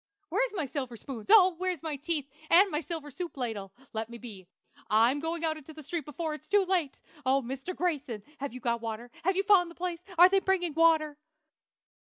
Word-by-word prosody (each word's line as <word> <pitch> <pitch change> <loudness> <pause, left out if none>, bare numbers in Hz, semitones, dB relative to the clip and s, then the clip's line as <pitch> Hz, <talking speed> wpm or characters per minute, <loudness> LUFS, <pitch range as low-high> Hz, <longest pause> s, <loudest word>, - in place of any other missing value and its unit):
Where's - - +1
my 320 - -1
silver 260 -4 -5
spoons? 235 -3 -8
Oh, 375 -4 +8
where's 365 -4 -2
my 315 -2 -2
teeth, 290 0 -2 0.2
and 380 +3 +6
my 300 - 0
silver 310 -1 -6
soup 345 +2 -6
ladle? 220 -6 -4 0.2
Let 220 0 -3
me 235 - -8
be! 210 -7 -10 0.4
I'm 230 +7 +4
going 325 +2 -2
out 315 -1 0
in 310 - -12
the 310 - -10
street 325 0 -4
before 310 +2 -4
it's 305 0 -10
too 410 -2 +4
late! 355 -7 0 0.2
Oh, 265 +1 +2
Mr. 265 +8 -5
Grayson! 280 - -2 0.2
have 280 0 -4
you 255 +1 -9
got 235 -1 0
water? 230 +1 -5
have 380 +3 +2
you 390 - +1
found 385 -4 +5
the 335 - -13
place? 350 -1 -4 0.2
are 350 +2 +10
they 390 +1 +3
bringing 370 -4 0
water? 315 -2 +3
305 Hz, 210 wpm, -29 LUFS, 255-350 Hz, 0.4 s, are